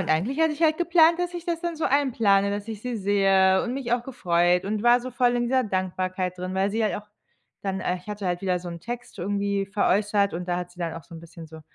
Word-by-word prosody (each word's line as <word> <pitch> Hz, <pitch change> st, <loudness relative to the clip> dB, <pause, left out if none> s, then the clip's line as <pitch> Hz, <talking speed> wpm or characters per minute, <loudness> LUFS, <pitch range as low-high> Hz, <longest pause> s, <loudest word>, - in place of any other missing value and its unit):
und 180 Hz, -, -3 dB
eigentlich 215 Hz, -, 0 dB
hatte 320 Hz, -1 st, +3 dB
ich 310 Hz, +3 st, -5 dB
halt 315 Hz, 0 st, +3 dB
geplant, 340 Hz, -1 st, +4 dB
dass 355 Hz, 0 st, -2 dB
ich 345 Hz, -, -6 dB
das 340 Hz, -2 st, -2 dB
dann 340 Hz, -1 st, -3 dB
so 315 Hz, -, -2 dB
einplane, 225 Hz, -8 st, +2 dB
dass 205 Hz, 0 st, -4 dB
ich 220 Hz, -2 st, -7 dB
sie 250 Hz, -2 st, -3 dB
sehe 195 Hz, -1 st, +3 dB
und 250 Hz, +1 st, -3 dB
mich 250 Hz, -3 st, -3 dB
auch 240 Hz, -1 st, +1 dB
gefreut 180 Hz, -7 st, +1 dB
und 210 Hz, +1 st, -2 dB
war 240 Hz, +1 st, +5 dB
so 255 Hz, +1 st, -6 dB
voll 245 Hz, 0 st, +2 dB
in 240 Hz, -, 0 dB
dieser 260 Hz, +2 st, +2 dB
Dankbarkeit 185 Hz, -1 st, -2 dB
drin, 185 Hz, +1 st, -5 dB
weil 195 Hz, +1 st, +1 dB
sie 225 Hz, +2 st, -1 dB
halt 215 Hz, -, 0 dB
auch 210 Hz, -, -9 dB, 0.5 s
dann 190 Hz, -1 st, -3 dB
äh, 180 Hz, -, -1 dB
ich 180 Hz, +4 st, -15 dB
hatte 205 Hz, -2 st, -4 dB
halt 175 Hz, -1 st, -1 dB
wieder 185 Hz, -2 st, 0 dB
so 175 Hz, -, -7 dB
'n 170 Hz, -1 st, -7 dB
Text 240 Hz, +1 st, -7 dB
irgendwie 200 Hz, +1 st, -1 dB
veräußert 200 Hz, 0 st, +1 dB
und 175 Hz, +2 st, -5 dB
da 175 Hz, -, 0 dB
hat 180 Hz, 0 st, -5 dB
sie 175 Hz, -, -20 dB
dann 170 Hz, -2 st, -3 dB
auch 165 Hz, -, -8 dB
so 170 Hz, -, -13 dB
'n 165 Hz, -, -9 dB
bisschen 165 Hz, -1 st, -12 dB
so 160 Hz, 0 st, -12 dB
200 Hz, 270 wpm, -25 LUFS, 185-245 Hz, 0.5 s, war